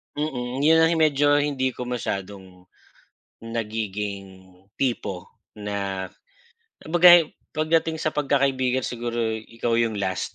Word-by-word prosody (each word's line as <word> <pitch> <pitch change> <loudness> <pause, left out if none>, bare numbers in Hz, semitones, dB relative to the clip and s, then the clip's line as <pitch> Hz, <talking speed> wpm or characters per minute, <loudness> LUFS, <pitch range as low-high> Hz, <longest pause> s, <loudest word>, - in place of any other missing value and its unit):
Mm, 130 -4 -3
'yan 160 +3 +5
ang 165 0 +2
medyo 145 -1 +3
hindi 140 -3 0
ko 125 0 -7
masyadong 95 -5 -6 0.8
nagiging 105 -4 -5 0.3
tipo 105 -8 -2 0.3
na 100 -2 -3 0.8
kumbaga'y 175 0 +6 0.2
pagdating 160 +1 0
sa 155 - +1
pagkakaibigan 135 -3 +1
siguro 120 -1 -3 0.2
ikaw 115 0 -1
'yong 115 -2 +1
last. 95 -2 -3
125 Hz, 105 wpm, -24 LUFS, 105-145 Hz, 0.8 s, kumbaga'y